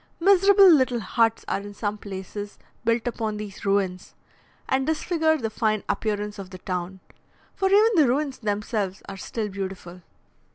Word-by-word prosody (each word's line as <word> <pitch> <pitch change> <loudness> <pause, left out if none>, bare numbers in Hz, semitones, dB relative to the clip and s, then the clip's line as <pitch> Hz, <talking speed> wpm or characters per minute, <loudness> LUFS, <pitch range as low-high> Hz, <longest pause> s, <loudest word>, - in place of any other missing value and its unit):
Miserable 390 +2 +6
little 260 -8 +5
huts 225 +2 +1
are - - -1
in 205 0 -10
some 205 0 -2
places 200 +1 -7 0.3
built 230 0 +1
upon 220 -3 -2
these 210 -2 -8
ruins, 195 -2 -1 0.5
and 265 0 0
disfigure 315 0 +1
the 225 -6 -3
fine 215 -1 0
appearance 210 -1 -2
of 190 -2 -8
the 185 - -9
town, 180 +1 -5 0.5
for 385 - 0
even 425 +3 +5
the 310 -8 +5
ruins 275 +2 -1
themselves 205 -2 -2
are 195 - -6
still 215 +3 -4
beautiful. 190 -2 -7
215 Hz, 155 wpm, -25 LUFS, 195-270 Hz, 0.5 s, Miserable